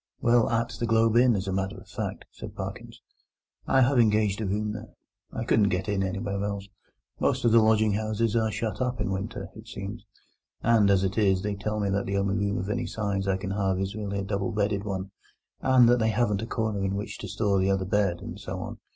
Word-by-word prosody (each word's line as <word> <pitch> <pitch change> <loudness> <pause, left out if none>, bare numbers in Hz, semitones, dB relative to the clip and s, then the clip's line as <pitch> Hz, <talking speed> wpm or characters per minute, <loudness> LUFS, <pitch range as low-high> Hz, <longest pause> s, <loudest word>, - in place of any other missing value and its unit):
"Well, 120 -1 +3
at 115 0 0
the 120 - -1
Globe 115 0 +3
Inn, 120 -1 +5
as 95 0 -3
a 95 - -1
matter 95 +1 -2
of - - -13
fact," - - -5
said - - -9
Parkins; - - -7 0.6
"I 135 - +4
have 130 +1 +4
engaged 105 -2 +3
a 105 - -1
room 105 +2 -1
there. 110 0 -9 0.4
I 115 - -3
couldn't 105 -3 +3
get 95 0 -1
in 100 -2 0
anywhere 100 +1 -2
else; 100 -1 -3 0.5
most - - +1
of 115 - +5
the 115 0 +7
lodging 110 -1 +4
houses 110 +1 0
are 110 -1 +2
shut 110 +3 -3
up 125 -1 -1
in 100 -2 -1
winter, 110 +6 -4
it 110 +1 -12
seems; 100 +1 -7 0.6
and, 110 -3 +4
as 95 -1 +4
it 95 +3 0
is, 95 -3 +3
they 105 0 -1
tell 105 +2 -3
me 100 -1 0
that 100 +1 -1
the 100 0 0
only 100 0 +1
room 100 -1 0
of 95 - -3
any 120 +4 -2
size 100 -2 -2
I 95 -1 +2
can 95 0 -5
have 95 -2 0
is 95 +1 -2
really 100 -1 -4
a 100 - -2
double 100 +3 -2
bedded 100 -1 0
one, 95 -1 -4 0.5
and 130 -2 +5
that 120 +1 +4
they 110 0 +2
haven't 110 -3 +1
a 115 - -4
corner 110 -4 -1
in 95 0 -1
which 100 +1 -5
to 100 - -6
store 100 0 +1
the 95 +1 +2
other 95 -1 +1
bed, 95 -3 +1
and - - -7
so - - -5
on. - - -7
105 Hz, 235 wpm, -27 LUFS, 100-110 Hz, 0.6 s, the